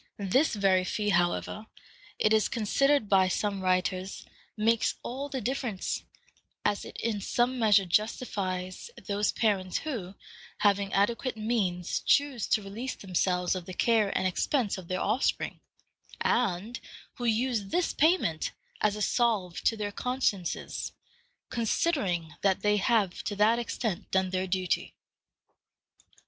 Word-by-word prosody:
This 215 Hz, +9 st, +2 dB
very 195 Hz, -2 st, +3 dB
fee, 210 Hz, +3 st, -1 dB
however, 175 Hz, +4 st, 0 dB, 0.5 s
it 215 Hz, -, +3 dB
is 215 Hz, -1 st, +3 dB
considered 275 Hz, +3 st, +2 dB
by 190 Hz, -2 st, +4 dB
some 200 Hz, +1 st, -1 dB
writers, 185 Hz, +1 st, -1 dB, 0.3 s
makes 225 Hz, +1 st, +2 dB
all 275 Hz, +4 st, -4 dB
the 265 Hz, -2 st, -3 dB
difference, 245 Hz, -6 st, -2 dB, 0.6 s
as 205 Hz, -1 st, +1 dB
it -, -, -10 dB
in 220 Hz, -3 st, -2 dB
some 245 Hz, +5 st, 0 dB
measure 210 Hz, -3 st, +5 dB
justifies 185 Hz, -, -1 dB, 0.2 s
those 205 Hz, 0 st, +1 dB
parents 195 Hz, -5 st, 0 dB
who, 215 Hz, -, -5 dB, 0.4 s
having 200 Hz, -1 st, +2 dB
adequate 230 Hz, +5 st, +1 dB
means, 200 Hz, -6 st, -1 dB
choose 280 Hz, -6 st, +2 dB
to 215 Hz, -, +2 dB
release 225 Hz, +7 st, -5 dB
themselves 180 Hz, -1 st, 0 dB
of 185 Hz, -2 st, -5 dB
the 185 Hz, -, -7 dB
care 225 Hz, -1 st, +3 dB
and -, -, 0 dB
expense 210 Hz, +5 st, +1 dB
of 180 Hz, -, -11 dB
their 185 Hz, +1 st, -2 dB
offspring, 255 Hz, -, 0 dB, 0.6 s
and 220 Hz, +1 st, 0 dB, 0.4 s
who 245 Hz, -, -4 dB
use 230 Hz, -1 st, +1 dB
this 345 Hz, -, 0 dB
payment 305 Hz, -, +2 dB, 0.3 s
as 210 Hz, -1 st, +2 dB
a 210 Hz, -, -2 dB
salve 210 Hz, -9 st, +1 dB
to 225 Hz, -, +3 dB
their 205 Hz, -1 st, -3 dB
consciences, 230 Hz, -6 st, -2 dB, 0.6 s
considering 205 Hz, -, 0 dB
that 195 Hz, -2 st, +2 dB
they 210 Hz, 0 st, +3 dB
have 205 Hz, -3 st, +1 dB
to 205 Hz, -, -2 dB
that 215 Hz, +3 st, +4 dB
extent 225 Hz, -4 st, -3 dB
done 190 Hz, -1 st, +1 dB
their 185 Hz, 0 st, -1 dB
duty. 185 Hz, -1 st, -1 dB
205 Hz, 135 wpm, -29 LUFS, 185-235 Hz, 0.6 s, measure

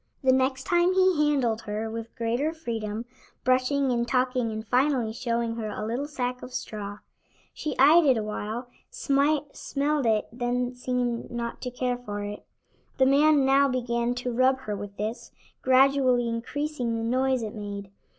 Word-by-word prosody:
The 260 Hz, -, +5 dB
next 260 Hz, 0 st, +1 dB
time 350 Hz, +3 st, +3 dB
he 370 Hz, -5 st, +4 dB
handled 240 Hz, -6 st, +1 dB
her 215 Hz, +2 st, -2 dB
with 230 Hz, 0 st, -7 dB
greater 240 Hz, +7 st, -1 dB
freedom, 230 Hz, -7 st, -4 dB, 0.4 s
brushing 260 Hz, +2 st, +2 dB
and 235 Hz, -1 st, 0 dB
talking 250 Hz, -2 st, +1 dB
and 220 Hz, 0 st, -5 dB
finally 250 Hz, -2 st, +2 dB
showing 235 Hz, -1 st, -2 dB
her 220 Hz, -2 st, -3 dB
a 215 Hz, +1 st, -4 dB
little 245 Hz, +6 st, -2 dB
sack 250 Hz, -3 st, -3 dB
of 250 Hz, -, -9 dB
straw. 205 Hz, -4 st, -5 dB, 0.6 s
She 305 Hz, -3 st, -4 dB
eyed 310 Hz, +5 st, +7 dB
it 260 Hz, -4 st, +4 dB
awhile, 215 Hz, +3 st, -4 dB, 0.2 s
smelled 290 Hz, -, 0 dB
it 215 Hz, -1 st, +2 dB
and 235 Hz, -, -15 dB
then 245 Hz, +1 st, 0 dB
seemed 245 Hz, -1 st, -2 dB
not 235 Hz, -1 st, -5 dB
to 250 Hz, -, -3 dB
care 250 Hz, 0 st, -2 dB
for 205 Hz, -4 st, -5 dB
it. 205 Hz, 0 st, -6 dB, 0.5 s
The 265 Hz, -, +5 dB
man 285 Hz, +1 st, +5 dB
now 275 Hz, +1 st, +5 dB
began 240 Hz, -1 st, -1 dB
to 245 Hz, 0 st, -3 dB
rub 260 Hz, +2 st, +3 dB
her 210 Hz, -5 st, -4 dB
with 200 Hz, 0 st, -8 dB
this, 215 Hz, +4 st, -5 dB, 0.3 s
gradually 260 Hz, -2 st, +4 dB
increasing 245 Hz, +1 st, -2 dB
the 225 Hz, -, -3 dB
noise 255 Hz, +1 st, +1 dB
it 215 Hz, -, -5 dB
made. 200 Hz, -2 st, -6 dB
250 Hz, 165 wpm, -26 LUFS, 230-270 Hz, 0.6 s, eyed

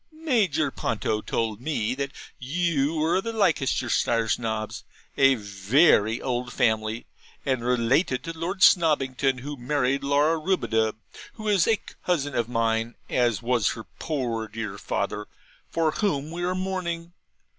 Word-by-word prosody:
'Major 220 Hz, -, +1 dB
Ponto 110 Hz, -2 st, -1 dB
told 110 Hz, -1 st, -2 dB
me 125 Hz, -5 st, -1 dB
that 140 Hz, +1 st, -3 dB, 0.3 s
you 155 Hz, +1 st, 0 dB
were 160 Hz, +3 st, +2 dB
of 190 Hz, -, -1 dB
the 230 Hz, -, -3 dB
Leicestershire 130 Hz, -, +1 dB
Snobs: 110 Hz, -1 st, -2 dB, 0.3 s
a 135 Hz, -1 st, +5 dB
very 105 Hz, -, +3 dB
old 125 Hz, -1 st, -2 dB
family, 110 Hz, 0 st, 0 dB, 0.4 s
and 130 Hz, -4 st, 0 dB
related 125 Hz, +3 st, +1 dB
to 165 Hz, -, -5 dB
Lord 185 Hz, +4 st, -2 dB
Snobbington, 135 Hz, -6 st, +3 dB
who 145 Hz, +2 st, -5 dB
married 135 Hz, +1 st, 0 dB
Laura 145 Hz, +3 st, +2 dB
Rubadub, 110 Hz, -, +1 dB, 0.4 s
who 215 Hz, -1 st, -7 dB
is 200 Hz, -5 st, +3 dB
a 225 Hz, -, +4 dB, 0.3 s
cousin 145 Hz, -6 st, 0 dB
of 120 Hz, -1 st, -1 dB
mine, 115 Hz, 0 st, 0 dB, 0.2 s
as 120 Hz, -5 st, +1 dB
was 120 Hz, -3 st, +2 dB
her 115 Hz, -, -8 dB, 0.2 s
poor 120 Hz, -8 st, -2 dB
dear 105 Hz, -2 st, -6 dB
father, 105 Hz, +2 st, -3 dB, 0.4 s
for 165 Hz, -2 st, +1 dB
whom 155 Hz, -6 st, -1 dB
we 175 Hz, +1 st, -5 dB
are 180 Hz, +1 st, 0 dB
mourning. 175 Hz, -3 st, -3 dB
135 Hz, 140 wpm, -25 LUFS, 115-165 Hz, 0.4 s, a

